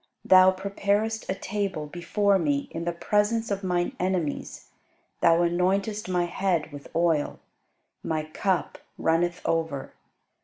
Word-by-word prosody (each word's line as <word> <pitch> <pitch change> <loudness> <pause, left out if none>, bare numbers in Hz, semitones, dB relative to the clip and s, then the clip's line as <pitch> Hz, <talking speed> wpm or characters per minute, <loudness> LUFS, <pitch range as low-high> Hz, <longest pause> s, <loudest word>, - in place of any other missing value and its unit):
Thou 185 0 +8
preparest 200 +3 -1
a 190 - 0
table 195 -5 -3
before 190 +5 +1
me 145 -4 0
in 165 +1 -5
the 175 - 0
presence 210 +5 0
of 200 0 -2
mine 180 -1 0
enemies: 180 -5 -2 0.5
Thou 165 0 +5
anointest 190 +4 0
my 180 -1 +1
head 175 -3 -1
with 145 -1 -9
oil; 165 -3 +1 0.6
my 155 -1 -2
cup 175 +4 -2 0.2
runneth 175 +2 +1
over. 160 -4 -1
180 Hz, 125 wpm, -26 LUFS, 165-200 Hz, 0.6 s, Thou